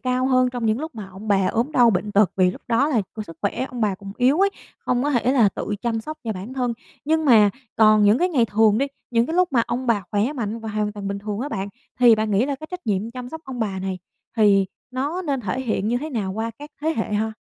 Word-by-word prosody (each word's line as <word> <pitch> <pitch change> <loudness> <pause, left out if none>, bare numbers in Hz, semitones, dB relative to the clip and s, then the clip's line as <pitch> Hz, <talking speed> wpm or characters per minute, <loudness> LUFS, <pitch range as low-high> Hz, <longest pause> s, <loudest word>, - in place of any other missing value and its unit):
cao 255 0 0
hơn 255 -1 +3
trong 245 -2 -3
những 220 +3 +1
lúc 315 -2 -6
mà 210 -4 -7
ông 195 +3 -10
bà 195 -2 +3
ốm 240 +7 0
đau 240 -4 +5
bệnh 205 +2 -2
tật, 200 -2 +4
vì 185 -1 +4
lúc - - -10
đó 245 +6 +3
là, 235 -8 +1
kiểu, 215 - -4
sức 165 -6 -11
khỏe 230 +5 -1
ông 245 - -6
bà 210 -3 +1
cũng 195 +1 -9
yếu 270 +8 +3
ấy, 400 - +4 0.4
hông 245 0 +1
có 290 - 0
thể 250 0 +2
là 230 -7 +5
tự 205 +2 -4
chăm 230 -2 -1
sóc 310 +7 -7
cho 220 - -1
bản 195 +6 -7
thân. 250 -2 0 0.3
Nhưng 315 +1 +1
mà 220 -6 +6 0.3
còn 215 -1 +6
những 210 +5 +5
cái 360 - +2
ngày 265 -9 +2
thường 220 0 +3
đi, 275 - +1 0.2
những 235 0 +2
cái 325 - -3
lúc 360 -3 +2
mà 235 -3 +4
ông 255 +2 -3
bà 225 -4 +2
khỏe 215 +7 +1
mạnh 230 -5 -3
và 225 -1 -7
hoàn 210 -1 -1
toàn 205 -1 -5
bình 200 0 -3
thường 205 +1 -4
á 285 - -3
bạn, 195 -6 -3 0.3
thì 240 -2 +8
bạn 215 0 -1
nghĩ 210 +6 +2
là 285 - -1
cái 310 - -9
trách 360 -5 -7
nhiệm 210 +2 -1
chăm 250 0 -7
sóc 320 +4 -8
ông 255 -3 -6
bà 195 -3 -2
này 190 -1 -3 0.4
thì 200 -3 +4 0.2
nó 285 +8 -2
nên 280 -5 -1
thể 240 +4 -3
hiện 220 -4 -1
như 240 - +1
thế 310 +3 -6
nào 200 -6 -2
qua 225 +2 -3
các 295 +1 -10
thế 320 +1 0
hệ 220 - -2
ha? 220 +1 0
230 Hz, 280 wpm, -22 LUFS, 210-260 Hz, 0.4 s, thì